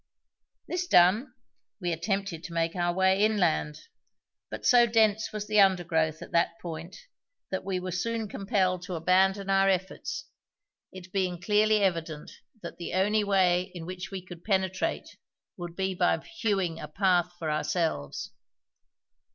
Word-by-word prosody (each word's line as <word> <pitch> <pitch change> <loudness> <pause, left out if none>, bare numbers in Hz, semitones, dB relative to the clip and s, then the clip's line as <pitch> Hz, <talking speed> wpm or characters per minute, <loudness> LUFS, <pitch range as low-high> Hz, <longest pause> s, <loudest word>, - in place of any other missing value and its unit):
This 360 0 -2
done, 210 - +4 0.4
we 175 -3 -2
attempted 190 0 -2
to 170 - -8
make 165 +1 0
our 175 -1 +1
way 190 +2 +3
inland, 75 - +1 0.7
but - - -7
so 240 -1 +6
dense 220 -1 +2
was 215 -1 -4
the 215 0 +2
undergrowth 165 -5 +2
at - - -12
that 170 0 +1
point 165 +1 -7 0.5
that 190 - -2
we 185 -1 -2
were 185 0 -5
soon 225 +5 -2
compelled 190 -2 0
to 185 -2 -5
abandon 190 +4 +2
our 195 0 +4
efforts, 280 - -2 0.7
it 185 -1 -11
being 185 -3 -1
clearly 210 +3 +3
evident 165 -5 -2 0.3
that 170 - -7
the 175 - -5
only 210 +3 +2
way 185 -2 +2
in 165 -2 -6
which 180 +1 -6
we 190 -2 -7
could 175 -2 -11
penetrate 190 -2 -1 0.4
would 175 -1 -7
be 190 0 -1
by 175 -1 +2
hewing 200 - -2
a - - -6
path 180 +1 +1
for 160 -3 -3
ourselves. 155 - -2
185 Hz, 150 wpm, -28 LUFS, 175-200 Hz, 0.7 s, so